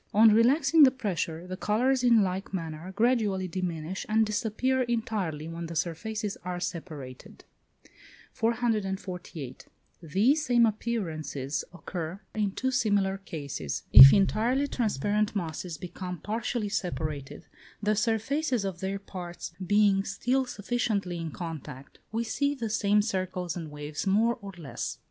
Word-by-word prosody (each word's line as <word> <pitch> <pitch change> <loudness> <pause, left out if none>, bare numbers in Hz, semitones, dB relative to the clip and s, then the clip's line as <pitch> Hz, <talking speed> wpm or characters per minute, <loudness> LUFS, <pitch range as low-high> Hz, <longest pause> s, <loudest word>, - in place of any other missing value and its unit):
On 220 0 +7
relaxing 280 +8 +4
the 275 - +10
pressure, 180 - -3
the 185 0 -5
colours, 250 +7 +1
in 235 -4 +5
like 190 +1 -3
manner, 165 +1 -5
gradually 210 -4 +1
diminish, 180 -1 -4
and 220 +1 +4
disappear 225 +5 0
entirely 215 -10 -2
when 165 0 -5
the 170 - -7
surfaces 200 +6 -2
are 180 0 -3
separated. 150 -8 -7 0.9
448. 195 - -2 0.3
These 210 - +2
same 240 -4 +4
appearances 165 - -2
occur 175 0 -6
in 210 -2 0
two 260 +4 -1
similar 205 -6 +1
cases. 140 - -5
If 135 +4 +13
entirely 225 +7 +2
transparent 210 - 0
masses 170 -2 -4
become 180 +1 -6
partially 220 +3 -2
separated, 155 -8 -4 0.4
the 210 +1 +2
surfaces 235 +3 0
of 190 -3 -4
their 195 +1 -2
parts 175 -4 -8
being 200 0 +3
still 250 +7 0
sufficiently 205 -5 -2
in 165 -1 -4
contact, 155 -5 -8
we 225 +2 -1
see 280 +5 0
the 230 -5 -4
same 210 -1 +3
circles 185 -4 -2
and 165 -3 -6
waves 150 +4 -5
more 225 +5 +2
or 200 -1 -8
less. 155 -5 -5
195 Hz, 130 wpm, -28 LUFS, 170-225 Hz, 0.9 s, If